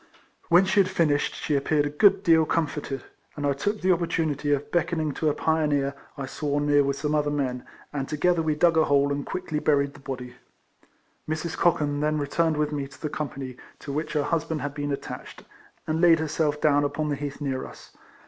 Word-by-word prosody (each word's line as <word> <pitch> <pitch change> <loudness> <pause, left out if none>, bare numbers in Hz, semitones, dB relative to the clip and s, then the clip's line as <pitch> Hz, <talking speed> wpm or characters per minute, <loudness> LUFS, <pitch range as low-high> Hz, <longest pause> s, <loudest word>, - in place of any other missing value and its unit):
When 175 +3 +6
she 195 - +2
had 190 -2 +4
finished 155 -6 +1
she 150 - -1
appeared 145 +1 +1
a - - -1
good 195 +5 +4
deal 165 -3 +5
comforted, 150 -4 -2 0.3
and 145 - -3
I 140 - +2
took 205 +10 -2
the 185 +1 +3
opportunity 160 -4 0
of 145 0 -1
beckoning 165 -3 0
to 155 +2 0
a 145 - -1
pioneer 150 -3 +1 0.2
I 140 - -3
saw 145 +2 -2
near 145 0 +3
with 140 0 0
some 150 +2 -2
other 150 -1 +1
men, 130 -4 -2 0.3
and 135 -2 -3
together 165 +3 +2
we 155 -1 0
dug 165 +1 +3
a 160 - +5
hole, 140 0 +3
and 140 0 -2
quickly 155 -2 -3
buried 140 -2 +2
the 145 - -14
body. 130 -2 -6 1.0
Mrs. 160 +1 -2
Cochan 150 -4 +1
then 155 +1 +1
re 145 - -1
turned 160 +2 +1
with 150 0 0
me 140 -2 -3
to 140 - -16
the 150 - -3
company 135 -4 -5 0.2
to 140 - -7
which 155 +1 -3
her 150 -2 +1
husband 160 0 -1
had 145 0 -3
been 145 0 -3
attached, 140 - -7 0.4
and 155 +1 -1
laid 170 -2 +7
herself 155 -1 -1
down 145 -1 +3
upon 150 +1 -1
the 145 - 0
heath 145 0 -5
near 135 -3 -3
us. - - -15
150 Hz, 210 wpm, -26 LUFS, 145-160 Hz, 1.0 s, laid